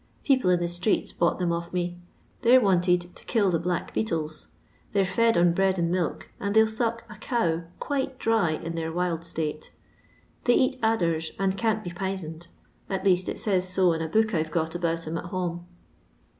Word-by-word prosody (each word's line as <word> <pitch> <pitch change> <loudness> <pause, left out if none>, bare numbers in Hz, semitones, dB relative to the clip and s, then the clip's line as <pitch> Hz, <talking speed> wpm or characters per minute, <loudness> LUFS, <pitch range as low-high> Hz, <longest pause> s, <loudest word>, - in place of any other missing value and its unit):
People 260 -9 +3
in 180 -1 +4
the 175 - 0
streets 175 +5 0
bought 170 - +1
them 180 -2 0
of 170 0 -3
me 175 -1 -2 0.2
— - - -35
they 245 +1 +7
'ra 255 - +3
wanted 180 -2 +2
to - - -13
kill 205 -5 +2
the 165 - +1
black 175 0 -2
beetles; 160 -7 -2 0.5
they 200 - +3
're - - +2
fed 230 +3 +2
on 170 0 +4
bread 190 +1 +2
and 170 -1 0
milk, 180 -3 -2
and 200 +1 -2
they 220 - +8
11 220 0 +1
sock 230 0 -1
a 210 - -11
cow 175 -8 0
quite 265 -2 -2
dry 225 -8 +2
in 165 +1 -3
their 165 -1 -3
wild 170 -1 -1
state. 155 -2 -4 0.7
They 245 - +5
eat 260 0 +2
adders, 170 -8 +1
and 195 -1 +1
can't 220 0 0
be 175 - -5
p'isoned, 175 -3 -5 0.4
at 190 0 -2
least 185 -1 +3
it - - -4
says 185 -3 0
to 185 -3 +4
in 165 - -3
a 160 - -2
book 215 +6 +2
I 165 - +2
We - - -1
got 160 0 -1
about 165 -1 -1
'em 160 +1 -3
at - - -8
home. 175 -1 -4
180 Hz, 210 wpm, -26 LUFS, 170-210 Hz, 0.7 s, they